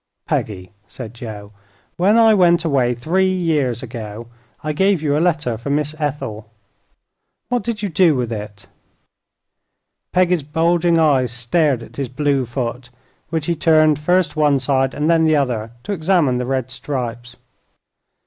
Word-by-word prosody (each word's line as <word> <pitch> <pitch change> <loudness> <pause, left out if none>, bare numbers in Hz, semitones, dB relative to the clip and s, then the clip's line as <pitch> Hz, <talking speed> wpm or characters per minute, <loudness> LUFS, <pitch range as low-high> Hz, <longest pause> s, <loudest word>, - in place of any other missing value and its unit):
"Peggy," 90 -4 -3 0.2
said 120 -3 -9
Joe, 105 -4 -9 0.4
"when 200 +6 +3
I 225 -1 +6
went 175 -3 +4
away, 130 -5 +1
three 185 +10 +1
years 150 -9 0
ago, 115 -2 -7 0.4
I 155 0 -2
gave 190 +3 +2
you 145 -2 +1
a 150 - +1
letter 155 -10 0
for 130 - -6
Miss 150 +1 0
Ethel. 115 -8 -4 1.0
What 245 -1 0
did 215 0 -4
you 205 - -1
do 170 -2 +3
with 125 -2 -2
it?" 105 -1 -8 1.5
Peggy's 180 -2 +2
bulging 165 +3 +1
eyes 135 -7 +3
stared 120 +2 0
at - - -14
his 135 -3 -3
blue 135 -1 0
foot, 120 0 -4 0.4
which 160 -2 -2
he 170 - +1
turned 155 -2 +3
first 180 +3 +1
one 150 -2 +3
side 135 0 0
and 150 +1 -1
then 165 -1 +4
the 155 -1 +3
other 120 -6 -1
to 210 - -5
examine 160 -8 +1
the 125 - -3
red 130 -1 -2
stripes. 120 -2 -5
145 Hz, 155 wpm, -19 LUFS, 120-170 Hz, 1.5 s, I